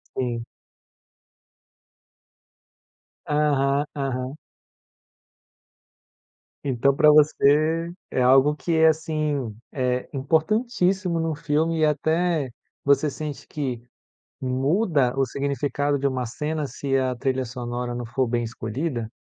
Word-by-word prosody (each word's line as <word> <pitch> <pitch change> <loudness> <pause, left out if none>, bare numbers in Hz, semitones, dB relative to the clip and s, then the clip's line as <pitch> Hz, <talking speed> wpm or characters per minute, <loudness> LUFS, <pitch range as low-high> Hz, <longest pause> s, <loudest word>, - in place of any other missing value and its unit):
Sim. 120 -2 -2 2.8
Aham, 145 -1 +2
aham. 135 -1 -3 2.3
Então 135 +1 +2
pra 150 +2 +6
você 155 +2 +3 0.2
é 130 - 0
algo 135 +4 +5
que 170 +2 -2
é, 160 0 +6
assim, 155 -6 0 0.2
é, 125 -2 -1
importantíssimo 180 - +1
num 160 -2 -1
filme 160 +2 0
e 155 - +4
até 160 0 +1 0.4
você 140 +2 +3
sente 150 0 -6
que 130 -6 -4 0.6
muda 135 - +1
o 135 - +3
significado 140 +2 -1
de 140 - 0
uma 130 -2 -1
cena 150 +5 -3
se 135 0 -2
a 130 -1 +1
trilha 130 +1 -1
sonora 120 0 -4
não 120 -1 -4
for 125 +3 0
bem 120 0 0
escolhida? 115 +2 -4
140 Hz, 105 wpm, -24 LUFS, 130-155 Hz, 2.8 s, pra